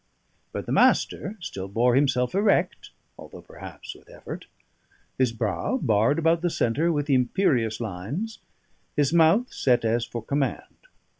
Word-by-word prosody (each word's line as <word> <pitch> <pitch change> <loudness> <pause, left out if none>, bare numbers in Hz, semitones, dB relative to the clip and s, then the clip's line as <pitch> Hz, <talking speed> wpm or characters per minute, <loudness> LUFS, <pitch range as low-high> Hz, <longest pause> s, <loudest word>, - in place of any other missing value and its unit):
But - - -5
the - - -5
Master 210 +3 +2
still 95 - -6
bore 120 +5 +2
himself 125 -2 +2
erect, 200 +1 +1 0.3
although - - -11
perhaps - - -10
with - - -20
effort; - - -9 0.7
his 130 -3 +3
brow 115 - -2
barred 115 - +2
about 165 0 +2
the 175 - +1
centre 155 +4 0
with 145 -2 -1
imperious 125 - +1
lines, 115 - -5 0.6
his 145 +1 +1
mouth 170 +9 +4
set 125 -3 +1
as 115 +1 +1
for 115 -1 -6
command. 140 - -3
135 Hz, 140 wpm, -25 LUFS, 115-165 Hz, 0.7 s, mouth